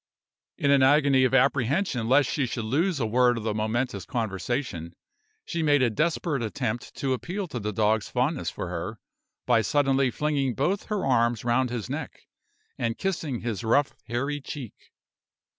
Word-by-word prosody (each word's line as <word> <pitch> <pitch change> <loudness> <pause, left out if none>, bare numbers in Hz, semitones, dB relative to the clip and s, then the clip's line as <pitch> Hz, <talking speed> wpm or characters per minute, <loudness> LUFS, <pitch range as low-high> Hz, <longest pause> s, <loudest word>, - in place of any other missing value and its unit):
In 140 - +2
an 140 -1 +5
agony 140 -1 +5
of 130 - 0
apprehension 135 - +2
lest 135 0 +5
she 135 0 0
should 115 -1 -4
lose 155 - +1
a 115 - +1
word 120 +2 +3
of 115 - -5
the 110 -1 -1
momentous 110 -1 -1
conversation, 95 - -3 0.5
she 170 - -3
made 145 -3 +4
a 120 - +2
desperate 155 +1 0
attempt 120 +1 -3
to 135 -1 -1
appeal 180 +9 -4
to 125 - -4
the 105 0 -3
dog's 105 0 +1
fondness 130 +4 0
for - - -5
her, 90 +5 -5 0.5
by 120 -2 +4
suddenly 135 +2 +2
flinging 140 -2 -1
both 180 +9 0
her 210 -6 -2
arms 120 -3 +2
round 125 +2 +2
his 120 -4 -4
neck, - - -6 0.6
and 115 -1 -1
kissing 160 -10 -2
his 115 -2 -3
rough, 135 +5 +2
hairy 140 +5 -2
cheek. 135 -5 -7
125 Hz, 165 wpm, -26 LUFS, 115-145 Hz, 0.6 s, an